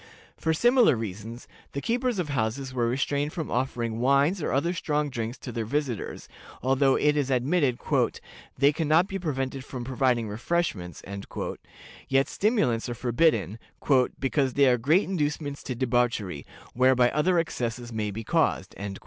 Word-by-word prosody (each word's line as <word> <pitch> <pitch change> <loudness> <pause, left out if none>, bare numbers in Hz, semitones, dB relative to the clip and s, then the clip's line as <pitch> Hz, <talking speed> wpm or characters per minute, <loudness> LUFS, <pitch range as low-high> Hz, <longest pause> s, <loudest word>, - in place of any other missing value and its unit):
For 160 - -1
similar 240 - +4
reasons, 110 +2 -6 0.3
the 140 - -2
keepers 240 - 0
of 175 -5 -2
houses 130 +1 -2
were 120 -2 +1
restrained 140 +4 -1
from 160 -3 -4
offering 120 -3 -1
wines 140 +8 +3
or - - -1
other 165 +6 +1
strong 150 -4 -1
drinks 115 0 -4
to 125 - -8
their 115 -1 -2
visitors, 130 -1 -3 0.4
although 135 +1 +3
it 150 0 +2
is 145 -3 0
admitted 130 0 +1 0.8
"they 140 +2 +4
can 160 +1 -2
not 160 +5 +4
be 195 -1 -4
prevented 135 -5 -3
from 130 -2 -6
providing 125 -2 +1
refreshments," 105 - -2 1.1
yet 135 +1 +3
stimulants 195 - +1
are 120 - -3
forbidden, 120 - +1 0.6
"because 135 -1 0
they 140 - +5
are 125 -2 +3
great 155 - +3
inducements 150 -5 -2
to 130 - -5
debauchery, 120 - 0 0.3
whereby 125 -1 +4
other 175 +5 +2
excesses 120 -7 -2
may 110 -1 -2
be 110 +3 -5
caused." 135 - 0
135 Hz, 150 wpm, -27 LUFS, 120-150 Hz, 1.1 s, they